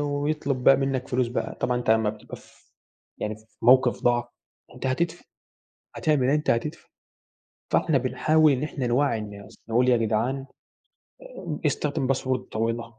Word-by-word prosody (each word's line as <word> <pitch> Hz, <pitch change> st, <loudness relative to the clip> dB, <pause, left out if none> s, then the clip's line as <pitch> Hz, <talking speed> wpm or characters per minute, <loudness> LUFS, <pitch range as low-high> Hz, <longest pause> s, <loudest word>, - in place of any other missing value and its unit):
ويطلب 145 Hz, -2 st, -1 dB
بقى 135 Hz, -, +7 dB
منك 135 Hz, -1 st, -2 dB
فلوس 125 Hz, -1 st, 0 dB
بقى، 125 Hz, -, -3 dB
طبعًا 125 Hz, -, +1 dB
أنت 120 Hz, -2 st, -1 dB
امّا 110 Hz, -1 st, +3 dB
بتبقى 110 Hz, -, -11 dB
ف -, -, -22 dB, 0.5 s
يعني 105 Hz, 0 st, -3 dB
في 110 Hz, -, -21 dB, 0.2 s
موقف 125 Hz, 0 st, +4 dB
ضعف، 120 Hz, 0 st, +2 dB, 0.5 s
أنت -, -, -5 dB
هتدفع، 170 Hz, +6 st, -1 dB, 0.7 s
هتعمل 145 Hz, -5 st, +1 dB
إيه، 140 Hz, -, +4 dB
أنت 150 Hz, -, -1 dB
هتدفع، 150 Hz, +8 st, -2 dB, 0.9 s
فإحنا 150 Hz, -4 st, +3 dB
بنحاول 155 Hz, +4 st, +3 dB
إن 135 Hz, +1 st, 0 dB
إحنا 140 Hz, -4 st, -3 dB
نوعّي 120 Hz, -1 st, +1 dB
الناس، 100 Hz, -2 st, -9 dB
نقول 125 Hz, +3 st, +3 dB
يا 120 Hz, -, +5 dB
جدعان 115 Hz, +5 st, -1 dB, 0.8 s
آآ -, -, -7 dB
استخدم 145 Hz, -2 st, -1 dB
باسورد 130 Hz, -1 st, 0 dB
طويلة، 115 Hz, +1 st, -2 dB
130 Hz, 150 wpm, -25 LUFS, 115-145 Hz, 0.9 s, بقى